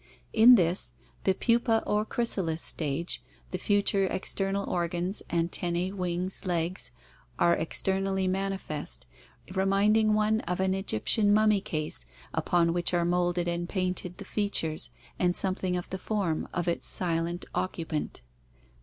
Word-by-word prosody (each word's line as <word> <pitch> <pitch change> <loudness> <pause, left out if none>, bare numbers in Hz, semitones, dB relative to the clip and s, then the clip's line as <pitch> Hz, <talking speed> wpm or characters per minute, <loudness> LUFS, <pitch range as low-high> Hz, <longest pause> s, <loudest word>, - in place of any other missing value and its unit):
In 235 +3 +9
this, 175 -2 +1 0.3
the 190 - +3
pupa 230 0 +2
or 210 +1 +1
chrysalis 195 -10 -1
stage, 155 +2 -2 0.3
the 185 - -3
future 200 -1 +2
external 195 +1 -2
organs 175 +2 -1
— - - -26
anten 170 +1 0
nae, 180 +2 -1
wings, 180 0 -2
legs 175 -1 -2 0.2
— - - -29
are 170 - +4
externally 190 +3 -1
manifest, 185 - -3 0.5
reminding 205 +3 +3
one 215 +1 +2
of 180 +1 -1
an 190 0 +2
Egyptian 195 - +2
mummy 210 -1 +4
case 155 - -4 0.3
upon 170 -1 +2
which 175 +1 +1
are 170 -1 +2
molded 175 0 +1
and 175 0 -2
painted 185 -2 -2
the 200 - -8
features 165 - -1 0.3
and 180 -1 +2
something 185 -1 +1
of 175 - -5
the 190 - -3
form 190 -6 -1
of 175 0 -2
its 170 - -1
silent 170 0 -1
occupant. 160 - -3
185 Hz, 140 wpm, -28 LUFS, 170-195 Hz, 0.5 s, In